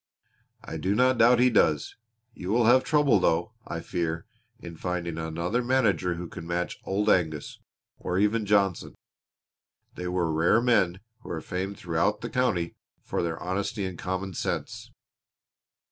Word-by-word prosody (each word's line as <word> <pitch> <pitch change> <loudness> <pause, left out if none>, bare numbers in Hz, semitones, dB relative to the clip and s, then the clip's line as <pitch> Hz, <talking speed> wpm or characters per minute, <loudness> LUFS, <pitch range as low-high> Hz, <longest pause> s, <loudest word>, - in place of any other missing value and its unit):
"I - - -6
do 100 +2 0
not 125 +1 +3
doubt 120 +2 +6
he 125 +1 +4
does. 75 -9 +2 0.4
You 90 - -7
will 115 +2 +3
have 125 +3 +6
trouble, 145 -8 +3
though, 85 -1 +1
I - - -4
fear, 80 -1 -3 0.3
in 85 -1 -9
finding 85 -1 -3
another 85 +9 -1
manager 115 -8 +2
who 85 +1 -6
can 85 - -9
match 85 +1 -2
Old 100 +2 -1
Angus 80 -7 +1 0.4
or 90 - -2
even 105 +2 +1
Johnson. 100 -3 +1 1.0
They 90 - -5
were 90 -3 0
rare 80 +8 +4
men 100 -7 +2 0.2
who - - -12
were 85 - -3
famed 95 +4 -4
throughout 90 +5 0
the 120 - -5
county 90 -10 0 0.3
for - - -2
their 85 -1 -2
honesty 100 +3 -2
and 95 -1 -5
common 95 +2 -4
sense." - - -4
95 Hz, 155 wpm, -27 LUFS, 85-110 Hz, 1.0 s, doubt